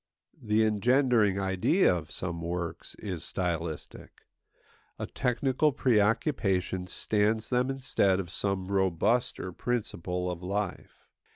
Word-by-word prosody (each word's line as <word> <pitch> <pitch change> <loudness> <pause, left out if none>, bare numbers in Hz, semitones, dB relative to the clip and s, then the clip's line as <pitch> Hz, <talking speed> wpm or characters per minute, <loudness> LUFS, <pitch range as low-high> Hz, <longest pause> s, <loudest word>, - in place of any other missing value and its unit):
The 110 0 +2
engendering 110 -2 +3
idea 95 - +3
of 80 -4 -5
some 85 -2 -4
works 85 0 -4
is 90 -5 -5
stylistic; 85 -3 -4 0.7
a - - -3
technical 130 +4 +1
preoccupation 105 - +1
stands 110 +3 +1
them 125 +1 +2
instead 125 -8 +1
of 85 -3 -5
some 95 -1 -2
robuster 95 +1 0
principle 90 -7 -2
of 90 -1 -6
life. 100 +1 -4
100 Hz, 105 wpm, -29 LUFS, 90-120 Hz, 0.7 s, engendering